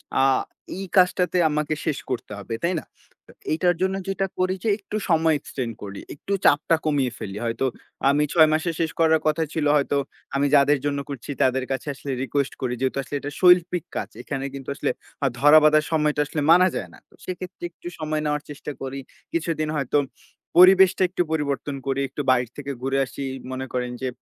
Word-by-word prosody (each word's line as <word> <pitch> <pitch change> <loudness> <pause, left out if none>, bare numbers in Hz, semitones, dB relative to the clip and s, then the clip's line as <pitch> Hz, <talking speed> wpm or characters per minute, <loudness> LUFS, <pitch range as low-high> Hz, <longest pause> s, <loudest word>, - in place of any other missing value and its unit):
অ্যা 135 - +4 0.5
এই 195 - -4
কাজটাতে 180 0 +3
আমাকে 150 0 -1
শেষ 155 -4 0
করতে 125 -4 -4
হবে, 100 +3 -6
তাই 170 +2 +2
না? - - -13 0.4
তো - - -15 0.2
এটার 175 +2 +2
জন্য 190 +1 +1
যেটা 195 0 0
করি 185 +1 +1
যে 225 - +1
একটু 205 0 -8
সময় 160 -1 +4
এক্সটেন্ড 125 -4 -5
করি, 100 -1 -7 0.2
একটু 195 +7 -4
চাপটা 150 +3 +4
কমিয়ে 140 -5 +1
ফেলি। 105 -4 -6
হয়তো 115 +3 -1 0.4
আমি 145 +2 +3
৬ 160 -3 +6
মাসে 160 +2 0
শেষ 165 -1 0
করার 160 -1 +4
কথা 155 +1 +2
ছিল 155 -2 -1
হয়তো। 145 -1 +1 0.4
আমি 140 +1 +2
যাদের 145 +1 +5
জন্য 140 -1 0
করছি 140 -2 -7
তাদের 130 0 +2
কাছে 135 +2 -3
আসলে 140 0 -6
রিকোয়েস্ট 140 +1 -1
করি। 125 -2 -1
যেহেতু 130 +1 0
আসলে 140 +2 -6
এটা 145 +1 -6
শৈল্পিক 180 -2 +5
কাজ। - - -3
এখানে 135 -1 -4
কিন্তু 135 -1 -7
আসলে - - -1 0.4
আ - - +5
ধরা 145 +3 +8
বাঁধার 155 0 +5
সময়টা 150 -2 +2
আসলে 150 +1 -3
মানা 180 +2 +7
যায় - - -4
না। - - -15
তো - - -25
সেক্ষেত্রে 185 0 -7
একটু 170 - -12
সময় 155 0 -1
নেওয়ার 150 0 -1
চেষ্টা 145 0 -6
করি। 135 +1 -4 0.3
কিছুদিন 165 -2 -1
হয়তো 140 -1 0 0.6
পরিবেশটা 190 +1 +7
একটু 180 - -1
পরিবর্তন 145 -2 -1
করি, 135 0 0
একটু 140 - -4
বাইর 125 -1 +3
থেকে 140 -1 -5
ঘুরে 135 +1 0
আসি। 135 - -9
এই 135 - -6
মনে 130 0 -4
করেন 125 -1 -2
যে, 130 - -1
150 Hz, 195 wpm, -24 LUFS, 135-165 Hz, 0.6 s, ধরা